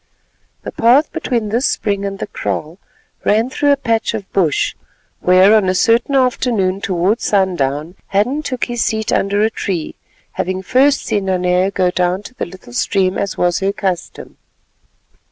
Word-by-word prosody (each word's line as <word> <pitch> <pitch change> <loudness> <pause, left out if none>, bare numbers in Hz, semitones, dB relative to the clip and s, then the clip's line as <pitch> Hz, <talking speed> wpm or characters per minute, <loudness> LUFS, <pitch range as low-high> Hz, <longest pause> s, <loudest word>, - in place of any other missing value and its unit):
The - - -6
path 250 +7 +3
between 240 -9 -2
this 235 +5 +1
spring 200 -1 -1
and 195 0 -4
the - - -4
kraal 165 -4 -4 0.4
ran 225 +5 +2
through 290 +2 +2
a 280 - +3
patch 230 -4 -1
of 200 -3 -6
bush, 170 -7 +1 0.5
where 185 +3 +5
on 210 -4 +3
a 185 - 0
certain 235 +7 +2
afternoon 235 -7 +1
towards 190 +5 0
sundown 170 -6 0
Hadden 245 +10 0
took 255 -5 -3
his 240 -1 -2
seat 220 0 -1
under 200 +1 +1
a 220 - +2
tree, 180 -7 -3 0.4
having 185 +1 -3
first 270 +6 +2
seen 200 -2 -1
Nanea 180 0 +1
go 185 -2 0
down 180 +2 0
to 255 - -11
the - - -4
little 175 -9 -13
stream 185 +10 +1
as 200 -1 -3
was 175 -1 +1
her 195 +1 0
custom. 190 -3 -4
200 Hz, 165 wpm, -17 LUFS, 185-230 Hz, 0.5 s, where